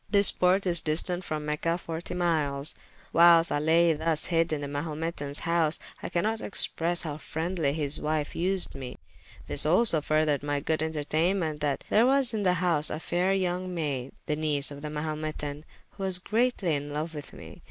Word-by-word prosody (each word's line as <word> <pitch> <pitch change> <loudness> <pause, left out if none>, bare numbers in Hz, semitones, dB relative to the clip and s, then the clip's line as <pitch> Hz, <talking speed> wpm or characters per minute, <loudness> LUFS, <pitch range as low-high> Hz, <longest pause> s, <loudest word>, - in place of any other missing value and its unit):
This 200 0 +8
porte 185 +2 +2
is 170 -3 +3
distant 175 +4 0
from 155 -3 -4
Mecha 150 +3 -1
40 165 +1 -6
miles. 155 -5 -1 0.4
Whilest 170 0 +6
I 145 - +1
laye 165 +2 +3
[p.356] - - -6
thus 160 -2 +1
hyd 165 -1 +1
in 150 -2 -2
the 145 - -4
Mahumetans 150 0 -4
house, 165 -2 +1 0.2
I - - -5
can 170 - -1
not 220 +1 -1
expresse 175 -3 0
how 150 -3 -5
friendly 160 -1 -2
his 145 -1 0
wyfe 150 -1 -2
vsed 185 +2 +1
me. 130 -2 -8 0.5
This - - +7
also 170 +1 +3
furthered 155 -1 +1
my 145 0 -2
good 160 +2 -1
enterteynement, 160 +1 -1
that 145 -2 -2
there 225 +3 +4
was 265 -3 +2
in 215 - -2
the 185 -2 +2
house 170 -4 +1
a 155 - -4
fayre 180 +3 0
young 185 -1 -2
mayde, 140 -5 -3
the 150 - -1
niese 150 -2 -1
of 145 0 -9
the 150 - -5
Mahumetan, 150 -1 -5 0.3
who 200 - -13
was 190 -2 +4
greatly 215 -2 0
in 145 0 -3
loue 150 - -1
with 145 -2 -8
me. - - -12
160 Hz, 190 wpm, -27 LUFS, 150-180 Hz, 0.5 s, This